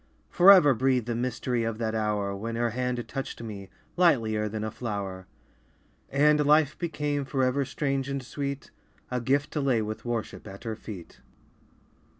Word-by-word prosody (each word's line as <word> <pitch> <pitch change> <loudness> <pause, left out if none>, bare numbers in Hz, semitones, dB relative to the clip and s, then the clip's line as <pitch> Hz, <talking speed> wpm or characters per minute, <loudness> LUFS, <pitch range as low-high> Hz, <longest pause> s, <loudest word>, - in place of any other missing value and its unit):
Forever 180 -6 +8
breathe 130 -1 +1
the 120 - -2
mystery 120 0 -1
of 115 -1 -2
that 110 -1 -2
hour 105 -2 -1
When 115 +3 -4
her 120 0 0
hand 125 0 -2
touched 135 -1 -5
me, 100 -4 -7 0.3
lightlier 110 -11 +2
than 110 0 -4
a 110 - -3
flower, 100 -5 -5 0.8
And 150 +2 +4
life 150 0 +4
became 150 -4 -2
forever 135 0 0
strange 135 0 -2
and 140 -1 -3
sweet, 140 +1 -5 0.4
A 125 -1 -1
gift 140 +4 +1
to 150 - -1
lay 125 -5 +2
with 110 +1 -5
worship 120 -2 -4
at 100 +2 -10
her 110 -2 -3
feet. 100 -6 -10
125 Hz, 155 wpm, -27 LUFS, 110-140 Hz, 0.8 s, Forever